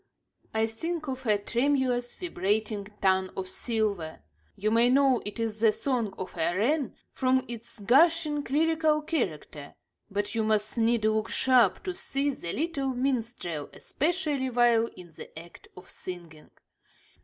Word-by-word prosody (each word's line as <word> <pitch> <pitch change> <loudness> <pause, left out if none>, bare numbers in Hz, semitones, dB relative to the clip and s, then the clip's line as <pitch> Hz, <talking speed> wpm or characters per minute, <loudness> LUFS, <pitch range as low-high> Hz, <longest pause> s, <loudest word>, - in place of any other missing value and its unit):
I 220 0 +1
think 310 +8 -4
of 260 -2 -5
a 210 -1 +4
tremulous, 245 +2 0
vibrating 210 - -1 0.2
tongue 190 -1 +3
of 190 -1 -3
silver. 200 - -2 0.3
You 215 +2 -1
may 230 +2 +4
know 265 -1 +4
it 210 - -6
is 220 -1 -2
the 225 -1 +5
song 235 -6 -2
of 185 - -6
a 170 +2 +1
wren 270 +4 +1 0.2
from 260 0 +1
its 235 0 -7
gushing, 300 - +4
lyrical 310 +1 +2
character; 160 - -3 0.3
but 205 +1 -2
you 225 - 0
must 215 -1 +1
needs 230 -1 +2
look 220 0 +1
sharp 250 -6 +3
to 370 - -3
see 285 -6 -1
the 170 -10 -5
little 290 - -1
minstrel, 235 - -2
especially 300 -5 -1
while 240 -2 +3
in 175 -2 -12
the 155 - -12
act 170 +1 -12
of 180 - -12
singing. 170 -4 -9
230 Hz, 145 wpm, -28 LUFS, 205-275 Hz, 0.3 s, the